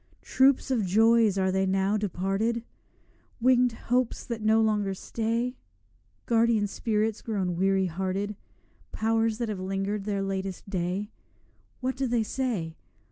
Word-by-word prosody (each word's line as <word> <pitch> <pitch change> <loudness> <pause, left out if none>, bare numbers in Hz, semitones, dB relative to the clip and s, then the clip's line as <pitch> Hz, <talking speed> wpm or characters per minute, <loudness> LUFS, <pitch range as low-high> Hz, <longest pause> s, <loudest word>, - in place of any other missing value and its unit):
Troops 265 0 +3
of 235 -5 +2
joys 220 +2 +4
are 190 -1 +2
they, 190 0 +1
now 195 +2 +1
departed? 205 +3 -1 0.8
Winged 250 0 +4
hopes 245 +1 -1
that 235 -2 -4
no 220 +1 +4
longer 210 -3 +1
stay? 230 +5 -2 0.7
Guardian 230 -2 +3
spirits 215 +1 -1
grown 190 -6 -2
weary 190 +1 +2
hearted? 190 +4 -2 0.6
Powers 225 0 +1
that 235 -1 -2
have 205 -3 -3
linger'd 195 +2 -2
their 200 -2 -1
latest 195 -1 -4
day? 190 +2 -2 0.7
What 260 +1 -1
do 265 0 -1
they 235 -2 +1
say? 215 -10 -3
210 Hz, 135 wpm, -27 LUFS, 195-230 Hz, 0.8 s, joys